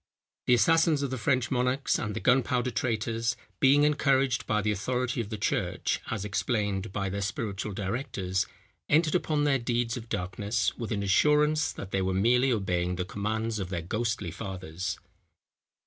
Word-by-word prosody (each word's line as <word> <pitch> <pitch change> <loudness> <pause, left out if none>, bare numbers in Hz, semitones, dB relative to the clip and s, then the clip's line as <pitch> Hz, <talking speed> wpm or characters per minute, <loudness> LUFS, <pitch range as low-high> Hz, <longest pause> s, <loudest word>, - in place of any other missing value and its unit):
The 125 - +6
assassins 160 +5 +3
of 135 - -2
the 130 - -2
French 125 +2 +1
monarchs 125 +2 +1
and 105 -3 -3
the - - -2
Gunpowder 125 0 +2
traitors, 115 0 -1 0.2
being 140 +2 +5
encouraged 135 -3 +2
by 105 -1 +1
the 105 - +1
authority 125 +4 -1
of 105 - -6
the 110 - -4
church, 105 - -1
as 105 -3 -3
explained 100 -2 -1
by 100 0 -2
their 100 +1 -3
spiritual 105 0 -3
directors, 95 -2 -2 0.4
entered 155 +1 +3
upon 155 -4 +1
their 140 -2 +3
deeds 120 +1 -1
of 115 -1 -9
darkness, 100 +1 -1
with 115 -3 -5
an 100 -2 -1
assurance, 150 +9 +3
that 100 - -8
they 95 - +1
were 95 0 0
merely 125 +6 +3
obeying 90 -5 0
the 90 0 -2
commands 110 +3 -2
of 95 -2 -4
their 85 -3 -3
ghostly 110 -1 -2
fathers. 95 -3 -5
110 Hz, 165 wpm, -28 LUFS, 100-130 Hz, 0.4 s, The